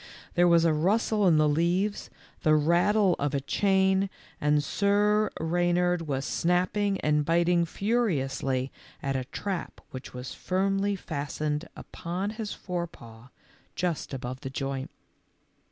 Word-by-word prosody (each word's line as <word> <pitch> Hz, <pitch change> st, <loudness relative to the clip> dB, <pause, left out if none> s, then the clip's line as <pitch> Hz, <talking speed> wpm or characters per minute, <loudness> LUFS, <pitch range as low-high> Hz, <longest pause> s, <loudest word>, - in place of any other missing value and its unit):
There 175 Hz, 0 st, +4 dB
was 170 Hz, -1 st, +5 dB
a 165 Hz, -, +4 dB
rustle 205 Hz, +5 st, +2 dB
in 165 Hz, -3 st, +5 dB
the 155 Hz, 0 st, +4 dB
leaves, 175 Hz, +7 st, 0 dB, 0.3 s
the 155 Hz, -1 st, +4 dB
rattle 175 Hz, +5 st, +3 dB
of 145 Hz, 0 st, -1 dB
a -, -, +2 dB
chain, 190 Hz, +5 st, +2 dB, 0.3 s
and 150 Hz, 0 st, +3 dB
Sir 205 Hz, +5 st, +2 dB
Eeynard 175 Hz, +1 st, +1 dB
was 135 Hz, -1 st, -2 dB
snapping 185 Hz, +3 st, +1 dB
and 150 Hz, 0 st, +2 dB
biting 170 Hz, +2 st, +2 dB
furiously 140 Hz, -, -1 dB, 0.3 s
at 135 Hz, -1 st, -1 dB
a 130 Hz, -1 st, -2 dB
trap 185 Hz, +6 st, -5 dB
which 130 Hz, 0 st, -8 dB
was 125 Hz, +1 st, -7 dB
firmly 195 Hz, +2 st, 0 dB
fastened 150 Hz, -2 st, -3 dB
upon 185 Hz, +4 st, -4 dB
his 220 Hz, -1 st, -5 dB
forepaw, 145 Hz, -11 st, -6 dB, 0.5 s
just 175 Hz, -4 st, -2 dB
above 130 Hz, -1 st, -5 dB
the 135 Hz, -, -6 dB
joint. 135 Hz, 0 st, -4 dB
170 Hz, 130 wpm, -28 LUFS, 145-195 Hz, 0.5 s, was